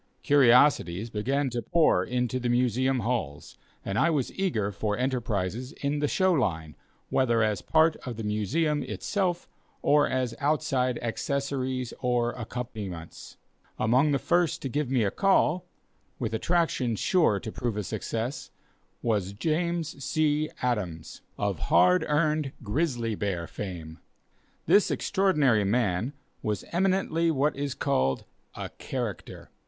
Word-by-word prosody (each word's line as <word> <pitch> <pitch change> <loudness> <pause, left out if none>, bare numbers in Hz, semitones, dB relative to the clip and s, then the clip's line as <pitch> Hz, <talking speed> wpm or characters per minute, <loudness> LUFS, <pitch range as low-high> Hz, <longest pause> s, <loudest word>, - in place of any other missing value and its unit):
Curiosities 125 - +4
began 135 +6 0
to 120 0 -2
pour 155 - +3
into 125 +2 -1
the 125 -1 -1
Museum 125 +1 +2
halls, 110 - -3 0.3
and 100 +1 -1
I 170 - +4
was 145 -6 -1
eager 115 - -1
for 105 +1 -2
enterprises 120 -2 -2
in 145 +1 -2
the 145 - +1
show 185 +4 +2
line, 80 - -1 0.4
whether 120 -3 +3
as 105 -3 0
part 160 0 +3
of 120 -4 -7
the 115 - -4
Museum 145 - 0
itself, 175 +6 -2 0.4
or 145 0 +4
as 130 -2 -1
outside 135 -4 +1
accessories 130 0 -2
or 120 -1 +1
accompaniments. 110 -8 -7 0.4
Among 130 +7 +3
the 140 - +3
first 175 +4 +1
to 135 - -2
give 145 0 -1
me 130 -3 +2
a 100 - +1
call, 185 -3 +2 0.5
with - - -3
attractions 130 - 0
sure 165 - +3
to 110 0 -6
prove 115 -2 -3
a 105 - -1
success, 115 +6 -4 0.5
was 100 -4 0
James 160 +3 -2
C. 155 0 +1
Adams, 95 -10 -2 0.2
of - - -1
hard 90 +1 +5
earned, 150 -2 +1
grizzly 120 -1 -1
bear 95 -5 -2
fame. 85 -4 -7 0.7
This 205 - +5
extraordinary 150 - +2
man 105 +2 0 0.3
was 105 -2 -2
eminently 175 -2 +1
what 150 -1 +1
is 140 -1 -3
called 65 0 0 0.3
"a - - -5
character." - - -5
125 Hz, 135 wpm, -27 LUFS, 105-150 Hz, 0.7 s, hard